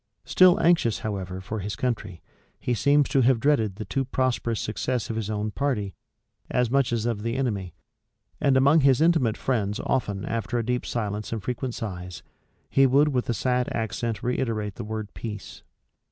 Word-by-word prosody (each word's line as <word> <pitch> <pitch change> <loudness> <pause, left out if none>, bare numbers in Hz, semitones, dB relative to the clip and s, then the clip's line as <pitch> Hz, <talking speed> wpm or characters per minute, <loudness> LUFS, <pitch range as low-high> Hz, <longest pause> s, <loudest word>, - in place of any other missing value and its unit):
Still 185 -1 +5
anxious, 160 -10 +3
however, 95 -3 -4
for 105 +3 -5
his 100 +1 -4
country, 105 -7 -3 0.4
he 125 - -1
seems 140 +4 +3
to 135 0 +3
have 125 -1 +4
dreaded 110 -8 +2
the 110 - -6
too 135 - -1
prosperous 125 -3 -1
success 120 +2 -2
of - - -4
his 110 -2 -3
own 105 0 -2
party 105 -8 -1 0.6
as 125 -2 +1
much 135 -2 +2
as 115 -1 -1
of 115 -3 -1
the 115 +2 -2
enemy; 105 -10 -2 0.6
and 135 -2 +3
among 140 +4 +5
his 135 -3 +4
intimate 160 -9 +3
friends 105 -4 -1
often 100 -7 -1
after 115 +1 -2
a 115 - -1
deep 125 +1 -1
silence 105 -2 -3
and 110 -3 -3
frequent 125 +1 -3
sighs, 90 -4 -6 0.4
he 135 0 +4
would 140 +4 +4
with 125 -4 -1
a 120 - +1
sad 125 0 0
accent 115 0 -2
reiterate 115 -4 -1
the 115 - -7
word 110 -1 -5
peace. 105 -4 -7
115 Hz, 180 wpm, -25 LUFS, 105-130 Hz, 0.6 s, Still